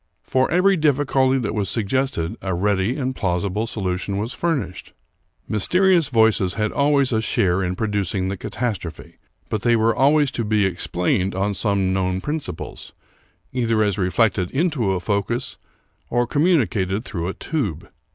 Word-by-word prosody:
For 130 0 +1
every 185 +3 +3
difficulty 135 -3 +2
that 115 -5 -2
was 100 -3 -1
suggested 110 -4 -1
a 95 -2 -2
ready 100 - 0
and 130 -2 -2
plausible 100 +3 -1
solution 95 -2 -3
was 110 +5 -3
furnished. 130 - -3 0.5
I^.Iysterious 180 - +3
voices 110 -6 +3
had 105 0 0
always 140 -2 +2
a 110 -2 +1
share 95 -4 +1
in 90 0 -2
producing 100 -3 -1
the 95 - -2
catastrophe; 100 -4 -5 0.3
but 110 - -2
they 120 0 +3
were 115 0 +2
always 145 +1 +3
to 115 - -2
be 105 -1 +2
explained 90 +1 -1
on 100 +2 0
some 100 -2 0
known 95 -1 0
principles, 145 - -5 0.6
either 115 -3 +1
as 105 -1 0
reflected 95 -1 +1
into 135 - 0
a 95 - -1
focus 100 +7 -2 0.5
or 120 0 +1
communicated 120 - +1
through 85 -5 -4
a 95 - -4
tube. 100 - -3
110 Hz, 150 wpm, -22 LUFS, 95-130 Hz, 0.6 s, every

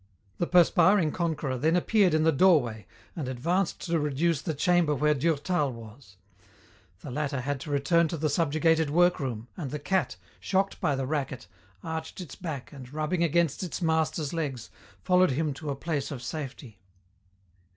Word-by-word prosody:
The 175 - 0
perspiring 175 0 +4
conqueror 155 -7 -2
then 160 +5 +2
appeared 185 -1 +3
in 155 - +2
the 160 - +4
doorway 135 - +3 0.3
and 150 -6 -4
advanced 170 +9 -1
to 170 -1 0
reduce 150 +1 0
the 160 -2 -3
chamber 170 0 +2
where 150 +2 +2
Durtal 150 +1 0
was. 115 -3 -13 0.8
The 140 - -8
latter 140 -1 -2
had 140 +1 -2
to 150 - -8
return 160 +4 +2
to 165 - -4
the 155 +1 0
subjugated 160 +1 +2
workroom, 140 -9 +1
and 150 -7 -5
the 150 - -4
cat, 185 - -1 0.2
shocked 195 0 -1
by 145 - +1
the 135 0 -2
racket, 135 - -3 0.4
arched 160 +1 -5
its 175 -7 -8
back 155 -8 -6
and, 130 -3 -11
rubbing 155 +3 -1
against 170 -2 +1
its 180 -4 -4
master's 160 -3 0
legs, 135 -8 -4 0.3
followed 180 0 +4
him 150 +2 -1
to 150 +2 -7
a 140 - -1
place 145 -1 -3
of 130 -4 -7
safety. 130 -6 -7
155 Hz, 165 wpm, -27 LUFS, 135-170 Hz, 0.8 s, perspiring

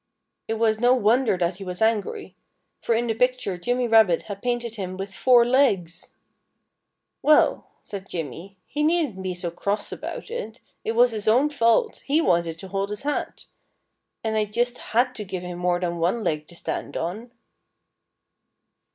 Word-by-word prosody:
It 225 - -1
was 220 -1 +1
no 245 +2 +5
wonder 235 -2 +3
that 175 0 -1
he 195 - -8
was 180 -1 -5
angry. 225 - 0 0.5
For 230 - +1
in 235 +1 +1
the 225 - 0
picture 250 -4 0
Jimmy 245 +5 0
Rabbit 220 -7 +5
had 200 -2 -7
painted 240 -2 -2
him 185 -4 -5
with 195 0 -6
four 245 +2 +5
legs! 220 -10 +1 1.1
"Well," 305 0 +4 0.2
said 195 -2 -8
Jimmy, 170 +5 -6
"he 295 - -4
needn't 305 - +1
be 185 -1 -3
so 175 -1 -4
cross 200 +4 -2
about - - -6
it. 245 - -5 0.2
It 225 - -1
was 240 +1 +5
his 215 -2 -4
own 260 +7 +4
fault. 280 - +2
He 290 +3 +2
wanted 170 - +1
to 190 +3 -10
hold 195 +1 -2
his 210 +4 -5
hat. 295 0 -3 0.8
And 220 -1 -1
I 215 -1 +2
just 240 +4 -1
had 250 +3 +1
to 215 - -6
give 185 -2 -5
him 180 0 -6
more 180 0 +1
than 175 -1 -2
one 185 +7 0
leg 155 -3 -1
to 175 - -15
stand - - -4
on." 200 +9 -4
220 Hz, 175 wpm, -24 LUFS, 185-245 Hz, 1.1 s, no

